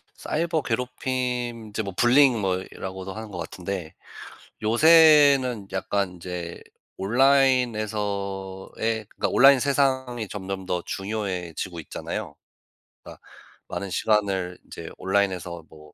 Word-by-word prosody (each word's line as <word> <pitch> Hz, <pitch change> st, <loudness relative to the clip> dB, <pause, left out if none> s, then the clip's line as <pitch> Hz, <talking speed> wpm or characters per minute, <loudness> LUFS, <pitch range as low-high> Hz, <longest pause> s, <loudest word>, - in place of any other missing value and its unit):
사이버 165 Hz, 0 st, -1 dB
괴롭힘 125 Hz, -1 st, -3 dB
인제 105 Hz, +1 st, -3 dB
뭐 100 Hz, -2 st, -6 dB
불링 125 Hz, 0 st, +5 dB
뭐 95 Hz, -2 st, +1 dB
이라고도 95 Hz, 0 st, -7 dB
하는 110 Hz, 0 st, -7 dB
것 90 Hz, -, -7 dB
같은데 85 Hz, 0 st, -5 dB, 0.7 s
요새는 140 Hz, -3 st, +5 dB
약간 95 Hz, 0 st, -1 dB
인제 85 Hz, -1 st, -7 dB, 0.4 s
온라인에서의 110 Hz, -4 st, 0 dB
그니까 -, -, -2 dB
온라인 135 Hz, 0 st, +6 dB
세상이 130 Hz, -4 st, 0 dB
점점 95 Hz, -1 st, -6 dB
더 90 Hz, -1 st, -1 dB
중요해지고 95 Hz, -4 st, -4 dB
있잖아요. -, -, -6 dB, 0.7 s
그러니까 -, -, -12 dB, 0.5 s
많은 100 Hz, -, -5 dB
시간을 95 Hz, -2 st, 0 dB
인제 -, -, -9 dB
온라인에서 95 Hz, -3 st, -1 dB
뭐 75 Hz, -1 st, -16 dB
105 Hz, 275 characters per minute, -25 LUFS, 95-125 Hz, 0.7 s, 온라인